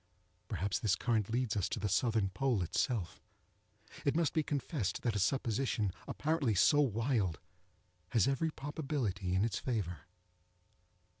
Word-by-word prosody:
Perhaps 100 0 -1
this 105 -5 +2
current 110 +1 0
leads 120 -1 0
us 100 -4 0
to - - -2
the 105 - -1
southern 110 -1 +2
pole 110 0 +1
itself. 100 - -1 0.8
It 140 - +1
must 165 -2 +2
be 160 - +3
confessed 145 - -2
that 115 -4 0
a - - +1
supposition 115 -2 +1 0.2
apparently 150 -7 0
so 145 +10 +5
wild 115 - +1 0.7
has 115 -6 +3
every 140 +4 +1
probability 135 - -2
in 95 +3 +3
its 115 - -2
favor. 90 - -3
115 Hz, 140 wpm, -34 LUFS, 100-135 Hz, 0.8 s, so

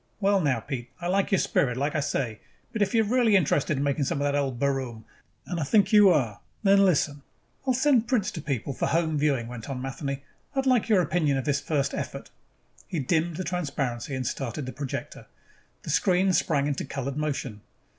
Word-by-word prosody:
"Well, 200 -1 +3
now, 140 -7 +1
Pete, 120 0 -6
I 175 - -6
like 190 +2 +1
your 195 - +4
spirit, 125 -7 +1
like 145 +3 0
I 155 - +1
say. 125 -6 -2 0.3
But 220 - -2
if 200 +2 +1
you 225 - +5
are - - -3
really 230 -1 +3
interested 150 -5 +2
in 140 - 0
making 140 0 0
some 140 - -1
of - - 0
that 145 0 +1
old 140 -3 0
baroom, 130 -4 -2 0.4
and 175 -3 -3
I - - 0
think 200 +7 +3
you 210 -2 +8
are, 125 - +1 0.2
then 200 0 +6
listen 145 -5 +1 0.2
" - - -39
"I'll 260 - +3
sell 265 -2 +4
prints 230 -4 0
to 160 - -6
people 140 -2 -3
for - - -1
home 160 -2 +1
viewing," 140 -5 +1
went 120 0 -8
on 135 -2 -3
Matheny. 135 +1 -4 0.3
"I'd 270 0 +1
like 250 -3 +3
your 195 -5 +5
opinion 150 -3 +1
of 130 - -3
this 140 -1 +1
first 140 -3 -1
effort." 135 - -5 0.6
He 180 - -4
dimmed 160 +4 0
the 185 - -2
transparency 140 -7 -3
and 130 -1 -3
started 135 +2 -3
the 130 - -6
projector. 140 -2 -6 0.6
The - - -3
screen 185 0 +3
sprang 150 -4 +2
into 145 -1 -1
colored 135 0 -4
motion. 140 -8 -3
145 Hz, 215 wpm, -26 LUFS, 135-185 Hz, 0.6 s, you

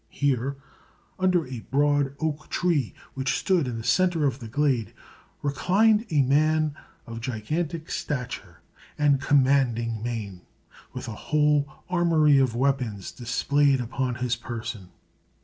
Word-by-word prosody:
Here, 140 -1 -1 0.6
under 180 -3 +2
a 125 -2 -6
broad 145 0 +2
oak 155 -1 -3
tree 160 -10 0 0.2
which 130 0 -1
stood 180 -7 +1
in 120 -2 -3
the 115 - -6
centre 175 +1 +2
of 135 -2 0
the 115 - -8
glade, 130 -2 0 0.5
reclined 210 - +2
a 150 -5 +3
man 155 +3 +2 0.3
of 115 0 -7
gigantic 155 +8 -3
stature 125 -4 -4 0.4
and 145 -2 +3
commanding 130 -5 +2
mien, 110 -6 -5 0.5
with - - -7
a - - -4 0.2
whole 150 -1 +3 0.2
armory 165 -5 +4
of 130 -4 +1
weapons 125 -6 -1
displayed 135 +3 +1
upon 125 +1 -2
his 125 0 -1
person. 115 -5 -6
140 Hz, 130 wpm, -26 LUFS, 120-150 Hz, 0.6 s, armory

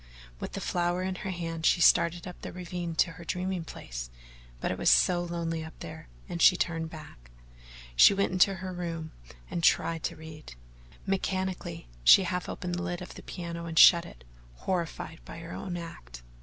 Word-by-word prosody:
With - - -6
the - - -3
flower 175 +1 0
in 190 0 -1
her 185 +1 -5
hand, 165 -3 -4
she 175 - +4
started 170 0 +4
up 180 - -9
the - - -6
ravine 175 -2 -5
to 165 - +2
her 165 +1 -11
dreaming 185 0 -2
place, - - -7 0.5
but - - -1
it - - -3
was - - +4
so 60 - +5
lonely 165 -2 -3
up 160 - -10
there - - -9 0.2
and 170 - -4
she 180 - +7
turned 165 -2 -1
back. 150 - -12 0.7
She 200 - +8
went 200 -1 +1
into 185 +1 +4
her 185 0 -6
room 165 -3 -5 0.4
and 170 - -2
tried 165 0 +3
to - - -3
read. 155 - -11 0.5
Mechanically, 190 - -2 0.2
she 190 - +8
half 180 0 -3
opened 180 -2 -4
the 175 - -2
lid 175 -1 -3
of - - -10
the - - -10
piano 170 -2 -6
and 165 -1 -6
shut 170 +1 +8
it, - - -14 0.3
horrified 170 - -3
by - - -10
her 165 0 -9
own 180 -3 -5
act. 60 - -9
170 Hz, 190 wpm, -29 LUFS, 160-180 Hz, 0.7 s, She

